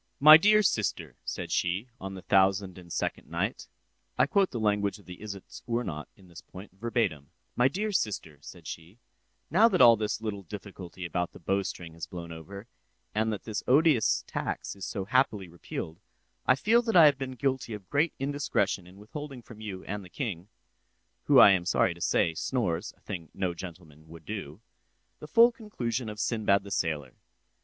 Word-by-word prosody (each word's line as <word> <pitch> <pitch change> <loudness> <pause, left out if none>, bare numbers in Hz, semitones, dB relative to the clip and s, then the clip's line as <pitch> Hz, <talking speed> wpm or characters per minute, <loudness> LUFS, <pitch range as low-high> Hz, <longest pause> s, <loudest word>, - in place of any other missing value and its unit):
"My 155 +2 +11
dear 210 +6 +5
sister," 90 - -1
said - - -4
she, 90 +7 0
on 95 0 -6
the 95 - -9
thousand 95 -1 +2
and 85 -1 -14
second - - -3
night, - - -3 0.5
(I - - +5
quote 195 -2 +2
the 120 - -4
language 105 -1 +1
of 105 - -19
the 90 0 -10
"Isitsöornot" 105 -3 -5
at 95 - -18
this 85 -1 -12
point, 95 +2 -12
verbatim) 95 - -2 0.3
"my 125 +1 +4
dear 210 +8 -2
sister," 100 - -2
said - - -12
she, 85 +6 -9 0.5
"now 210 +8 +6
that 190 -6 +1
all 115 -1 +9
this 105 -1 -2
little 105 -3 -4
difficulty 95 -1 -9
about 85 +1 -2
the - - -12
bowstring 90 -2 -2
has 80 -2 -7
blown 85 -3 -8
over, 100 +6 -9 0.5
and 110 +1 +1
that 105 - -5
this 105 -2 -3
odious 140 -3 +4
tax - - -4
is 100 - -7
so 95 - -4
happily 105 -4 +1
repealed, 85 -1 -7 0.5
I 130 - +6
feel 225 - +3
that 225 -3 -2
I 165 -3 +9
have 140 -2 +4
been 130 -1 -4
guilty 130 -3 -1
of 100 -3 -11
great 150 +2 +1
indiscretion 135 -10 -1
in 90 +2 -15
withholding 135 +4 -8
from 110 -2 -13
you 100 -4 -6
and 100 0 -5
the 90 - -13
king 95 - -4 0.8
(who - - +5
I - - +10
am 95 -2 +2
sorry 90 - +2
to 85 - -16
say, 80 - +2
snores—a 90 -2 -2
thing 85 -6 -7
no 95 -2 -1
gentleman 80 -3 -11
would 80 0 -13
do) 100 -4 -6 0.6
the 150 - -9
full 230 +9 +6
conclusion 125 - -4
of 105 0 -8
Sinbad 105 -3 +1
the 100 - -10
sailor. 75 -8 -2
100 Hz, 180 wpm, -28 LUFS, 90-125 Hz, 0.8 s, My